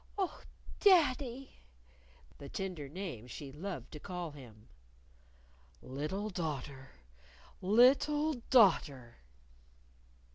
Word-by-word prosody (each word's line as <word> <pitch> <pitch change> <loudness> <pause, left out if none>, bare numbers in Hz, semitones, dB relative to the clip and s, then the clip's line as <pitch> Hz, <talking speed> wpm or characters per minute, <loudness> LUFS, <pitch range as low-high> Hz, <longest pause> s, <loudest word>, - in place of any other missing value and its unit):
"Oh, 385 -3 -2 0.4
daddy!" 275 - +3 0.8
the 140 - -9
tender 180 -8 -5
name 160 - -6
she 135 +2 -8
loved 155 -3 -7
to 150 - -8
call 180 -1 -5
him. 115 -7 -14 1.1
"Little 155 +11 -4
daughter! 145 -6 -5 0.7
Little 275 +9 +4 0.2
daughter!" 145 - +3
180 Hz, 80 wpm, -33 LUFS, -, 1.1 s, Little